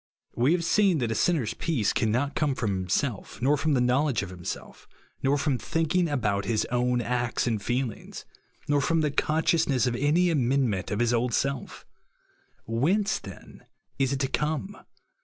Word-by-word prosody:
We 125 +7 +3
have 175 - +1
seeD 195 -1 +3
iard 120 -3 -1
a - - +1
sinner's 140 -3 +1
peace 130 -11 0
cannot 120 +6 0
come 145 -4 0
from 95 -6 -2
liimsolf, 110 +3 -2
nor 135 +5 +3
from 150 0 +1
the 125 - +2
know 125 +4 +2
ledo^e 130 -9 0
of 90 - -7
hirj^df 90 -1 -7 0.3
nor 135 +2 +2
from 140 -3 0
thinkinof 165 +1 0
about 105 -7 0
his 110 -2 0
own 125 0 +1
acts 120 0 -1
and 115 -3 0
feehngs, 120 +1 -4 0.4
nor 145 -1 +2
from 165 +3 +1
the 150 -2 0
consciousness 155 -3 +1
of 125 -1 0
any 155 +7 +2
amendment 125 - +1
of 105 - -2
his 120 0 +2
old 120 0 +1
seE 140 - +2 1.2
WTience, 175 - +1
then, 95 -3 -12 0.4
is 135 -1 +2
it 135 - -1
to 135 - +1
come 155 +8 -2
135 Hz, 175 wpm, -27 LUFS, 120-150 Hz, 1.2 s, We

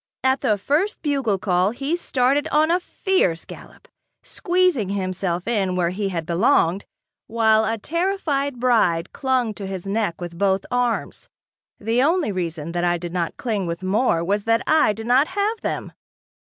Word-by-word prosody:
At 260 +1 +2
the 220 -6 +2
first 310 - -1
bugle 275 -9 0
call 185 -1 +1
he 275 +8 -2
started 280 -2 +1
on 310 +2 +2
a 355 - +3
fierce 355 - 0
gallop, - - -13 0.4
squeezing 360 - +1
himself 185 -2 -2
in 195 -6 0
where 175 -1 +1
he 195 +1 -2
had 165 -4 -3
belonged, 180 - +2 0.4
while 220 -1 +3
a 225 - -1
terrified 295 - -1
bride 205 -9 +2
clung 260 -5 0
to 200 -2 -7
his 190 -1 -6
neck 200 -3 -1
with 175 -1 -7
both 195 -1 +1
arms. 245 -2 -2 0.5
The 225 +3 +1
only 320 - +2
reason 170 -4 -4
that 175 0 -2
I 175 0 +2
did 170 0 -7
not 175 -2 -2
cling 210 -7 -2
with 170 +2 -5
more 190 -3 +1
was 200 +3 -1
that 230 0 +2
I 310 -8 +4
did 220 +1 -7
not 255 +5 +4
have 410 +4 -1
them. - - -3
220 Hz, 165 wpm, -22 LUFS, 185-275 Hz, 0.5 s, I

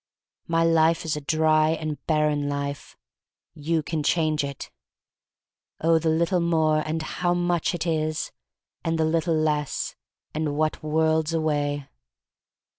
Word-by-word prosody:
My 165 0 +2
life 165 0 +3
is 155 - 0
a 150 - -4
dry 155 +1 +3
and 155 -2 -4
barren 150 -2 +1
life. 140 0 -4 0.6
You 155 +1 -1
can 160 +1 -2
change 155 -1 +1
it. 140 -1 -6 1.1
'*0h, 165 0 +4
the 160 - +1
little 170 +3 +2
more, 160 -2 +2
and 155 +1 -2
how 175 +2 -1
much 175 -1 0
it 170 - -3
is! 155 -2 -1 0.5
And 165 0 0
the 160 - +2
little 165 +1 +1
less, 150 -2 -1 0.4
and 150 -1 -2
what 155 0 0
worlds 160 +1 +1
away." 145 -3 -1
155 Hz, 135 wpm, -25 LUFS, 150-165 Hz, 1.1 s, 0h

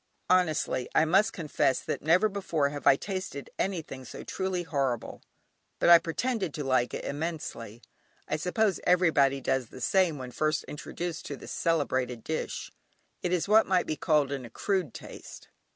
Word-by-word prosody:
Honestly, 160 -8 +2
I 155 - +5
must 195 +7 +4
confess 145 -5 0
that - - -3
never 175 +7 +4
before 185 -8 -1
have 145 -2 -4
I - - +8
tasted 185 -4 -5
anything 160 -8 -3
so 125 - -9
truly 190 -2 -2
horrible; 135 -7 -2 0.6
but - - +3
I 170 -1 +10
pretended 190 - -2
to 150 - -3
like 130 -2 +1
it - - -5
immensely. 145 -7 -5 0.4
I - - -1
suppose 190 +4 +1
everybody 160 -7 +4
does 130 -2 0
the 130 - -12
same 175 +3 +2
when 130 -2 -7
first 155 +2 0
introduced 170 +3 -6
to 140 - -5
this - - -10
celebrated 130 -7 0
dish: 160 - -4 0.5
it 180 - -1
is 180 0 +1
what 215 +2 +5
might 185 -2 +2
be 155 - -2
called 150 -3 +2
"an 135 -2 -3
accrued 165 - -2
taste." - - -10
155 Hz, 165 wpm, -29 LUFS, 135-180 Hz, 0.6 s, I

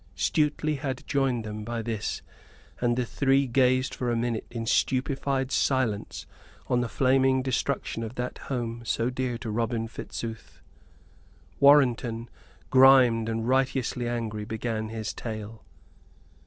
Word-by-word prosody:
Stuteley 150 0 +1
had 135 -1 -4
joined 135 -5 0
them 105 0 -6
by 115 +1 -4
this, 110 -2 -3 0.6
and 120 0 +1
the 125 - 0
three 135 +3 +2
gazed 130 +1 +2
for 125 - -2
a 120 - +1
minute 115 -1 -2
in 115 -1 -5
stupefied 135 +2 0
silence 130 -7 0 0.4
on 125 -1 +2
the 120 - -2
flaming 130 0 +3
destruction 130 -2 -2
of 115 +2 -6
that 125 0 -4
home 120 -3 -3
so 115 +1 0
dear 125 -1 -2
to 115 -2 -5
Robin 115 +1 -1
Fitzooth. 115 0 -7 1.0
Warrenton, 125 -5 +4 0.4
grimed 130 -4 +6
and 115 0 -2
righteously 130 -2 0
angry, 115 -3 -3
began 110 0 -3
his 110 -1 -4
tale. 110 -1 -7
120 Hz, 130 wpm, -27 LUFS, 115-130 Hz, 1.0 s, grimed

